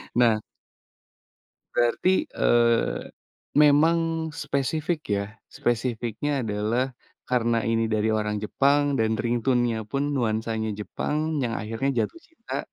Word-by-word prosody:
Nah 115 -3 +4 1.3
Berarti, 475 - +2
eee, 115 -1 +2 0.6
memang 160 +2 +3
spesifik 150 +3 -1 0.2
ya. 100 - -1 0.3
Spesifiknya 120 +3 -1
adalah 115 +4 -1 0.3
karena 120 -2 +2
ini 115 0 +2
dari 110 +1 +1
orang 105 -1 0
Jepang 140 +5 +2
dan 110 0 +1
ringtone-nya 120 -1 +1
pun 135 +6 -2
nuansanya 110 -2 -1
Jepang, 150 +7 -3 0.3
yang 115 - -1
akhirnya 115 +5 -2
jatuh 335 - -9
cinta 325 - -6
120 Hz, 105 wpm, -25 LUFS, 110-145 Hz, 1.3 s, Nah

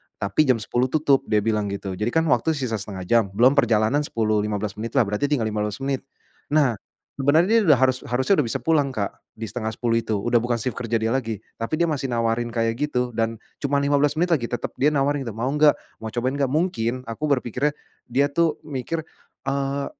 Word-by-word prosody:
Tapi 100 +9 +1
jam 130 - +5
10.00 120 +4 0
tutup, 140 -1 +2
dia 105 -2 +2
bilang 105 -2 0
gitu. 100 -1 -4
Jadi 105 +5 -2
kan 160 +6 +2
waktu 155 +6 +2
sisa 120 -6 -2
0,5 95 -2 -6
jam, 115 +4 +3
belum 125 +4 +6
perjalanan 120 -1 +3
10, 110 -7 0
15 105 0 -2
menitlah, 115 +4 +1
berarti 105 +6 -1
tinggal 140 -5 +1
15 105 -1 -2
menit. 135 0 -2 0.4
Nah, 140 -9 +2 0.4
sebenarnya 165 +11 +4
dia - - +2
udah 150 - +7
harus 130 0 +2
harusnya 130 +10 +2
sudah 130 - +2
bisa - - -2
pulang 145 -5 +2
Kak, 100 -1 -1 0.2
di 110 - -8
09:30 115 +1 -1
itu, 110 -1 -2
udah 120 +4 +2
bukan 120 +1 0
sif 120 +2 -2
kerja 115 -1 -3
dia 110 0 +1
lagi, 115 -5 -2 0.2
tapi 115 +7 -1
dia 170 - +1
masih 135 -2 -2
nawarin 115 +1 0
kayak 115 +1 -1
gitu, 125 -4 -1
dan 115 0 -1 0.2
cuma 140 0 -1
15 145 +1 +2
menit 175 +2 +1
lagi, 125 -8 +2
tetap 120 - -4
dia 140 - +4
nawarin 145 -2 +1
itu, 110 - -5
"Mau 125 +4 -1
enggak? 150 0 +5 0.2
Mau 110 - -6
cobain 125 +2 -1
enggak?" 140 - +2
Mungkin 130 -7 0
aku 115 +5 -7
berpikirnya 130 +4 -1 0.3
dia 140 +4 +1
tuh 165 +1 +2
mikir, 155 +3 -4 0.5
eee, 140 0 -1
125 Hz, 205 wpm, -23 LUFS, 115-145 Hz, 0.5 s, udah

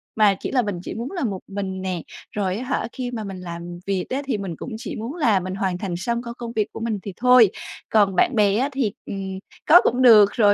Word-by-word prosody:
mà 210 -3 +4
chỉ - - -4
là 255 - +3
mình 205 -5 -3
chỉ - - -5
muốn 235 +4 -5
là 350 -7 -3
một 195 -5 -2
mình 195 -1 -4
nè, 185 -3 -3 0.3
rồi, 195 -2 -1
á 250 - -4
hả, 255 -3 -2
khi 250 -2 -5
mà 225 -3 -4
mình 195 -2 -7
làm 175 0 -7
việc 195 -2 -1
á 270 +2 -1
thì 260 -6 -1
mình 190 -5 -5
cũng 260 - -7
chỉ 225 -2 -6
muốn 235 +9 -5
là 230 - +3
mình 185 +1 -5
hoàn 190 -2 -1
thành 185 -2 -4
xong 235 +4 -2
công 235 -1 -7
công 235 -1 -6
việc 215 -1 0
của - - -6
mình 225 -3 -2
thì 200 - -6
thôi. 250 -4 +6 0.4
Còn 200 -3 +3
bạn 245 - +3
bè 205 -1 +3
á 270 +4 +1
thì, 260 -7 0
ừm, 190 -1 -5 0.3
có 340 +4 +8
cũng 250 +2 +1
được 215 -5 +8
rồi, 205 -3 +5
210 Hz, 260 wpm, -23 LUFS, 190-240 Hz, 0.4 s, có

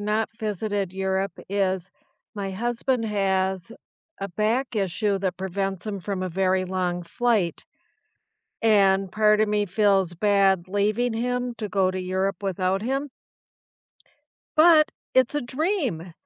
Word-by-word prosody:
not 210 +2 0
visited 205 -2 -2
Europe 190 +1 -1
is 190 -2 0 0.4
my 200 -2 -3
husband 240 +4 -1
has 190 -3 0 0.5
a 195 - -4
back 220 +8 -1
issue 200 0 0
that 190 -1 -2
prevents 190 +1 -3
him 200 -2 -4
from 190 +1 -3
a 185 - -3
very 185 +1 +1
long 180 -1 -2
flight. 205 0 0 1.0
And 195 -3 +3
part 215 0 +4
of 215 - +1
me 210 0 +1
feels 195 -2 +2
bad 195 -1 +2
leaving 210 +5 +1
him 245 +1 -2
to 215 -1 -4
go 190 -1 +2
to 185 - -4
Europe 190 +2 -2
without 190 0 0
him 270 +5 -2 1.5
but 315 -1 +7 0.3
it's 260 +1 +3
a 295 - +1
dream! 255 - -2
200 Hz, 135 wpm, -25 LUFS, 190-220 Hz, 1.5 s, but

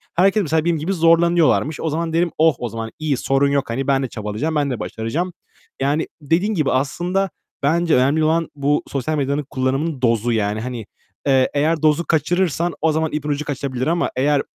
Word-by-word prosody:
Herkes 195 +4 +3
mesela 160 +1 0
benim 170 -2 +2
gibi 170 +6 -2
zorlanıyorlarmış. 165 -2 +3
O 160 - -1
zaman 165 +1 -2
derim, 170 -1 +1
"Oh 160 -3 +4
o 120 - -3
zaman, 115 0 -5
iyi 150 -4 0
sorun 135 +2 +2
yok, 140 -3 0
hani, 135 +4 -2
ben 135 -1 +2
de - - -1
çabalayacağım, 110 +9 -3
ben 145 -2 +1
de 120 - -3
başaracağım." 160 +11 -3 0.5
Yani, 145 +4 +1
dediğin 175 +9 +1
gibi 155 -7 +1
aslında 175 +8 0 0.3
bence 165 +3 +2
önemli 140 +5 +3
olan 165 +1 +1
bu 145 +1 +1
sosyal 145 +3 -2
medyanın 140 +1 -1
kullanımının 135 +2 -1
dozu 115 -1 +2
yani. 105 -1 0
Hani, 120 -3 -5 0.4
eee, 130 -1 +4
eğer 155 +2 +1
dozu 155 +2 +2
kaçırırsan 170 +1 +1
o 160 0 +3
zaman 160 0 0
ipin 150 0 -3
ucu 145 +1 -1
kaçabilir 135 -2 -3
ama 170 +1 +1
eğer 140 +2 +2
150 Hz, 190 wpm, -20 LUFS, 135-165 Hz, 0.5 s, Oh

